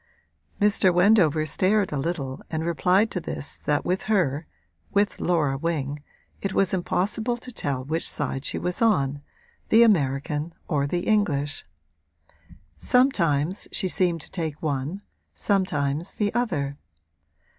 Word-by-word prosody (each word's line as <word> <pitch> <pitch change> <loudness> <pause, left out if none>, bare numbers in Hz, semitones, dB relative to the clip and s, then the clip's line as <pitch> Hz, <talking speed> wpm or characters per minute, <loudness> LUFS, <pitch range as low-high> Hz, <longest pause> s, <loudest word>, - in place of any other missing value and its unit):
Mr. 205 -2 +4
Wendover 175 -4 +4
stared 190 +6 +2
a 145 - -2
little 140 -4 -3
and 160 0 -2
replied 180 +5 +2
to 180 - -1
this 150 -3 -6
that 145 -1 +1
with 185 +2 0
her 165 -7 +1 0.4
with 205 0 0
Laura 150 -6 +1
Wing 145 -3 -2 0.4
it 195 -1 -2
was 195 -2 +2
impossible 210 +6 -1
to 250 +1 -10
tell 140 - -2
which 160 +3 0
side 135 -2 -2
she - - -2
was 180 +4 -3
on, 145 -11 +2 0.5
the 225 +2 +7
American 150 - +1
or 140 -2 0
the 175 +4 -1
English: 150 -10 0 1.1
sometimes 185 - +2
she 190 - 0
seemed 175 -3 +1
to - - -10
take 160 -5 -3
one, 150 +6 -2 0.3
sometimes 160 -5 -1
the 205 -1 0
other. 145 - -1
170 Hz, 135 wpm, -25 LUFS, 145-200 Hz, 1.1 s, the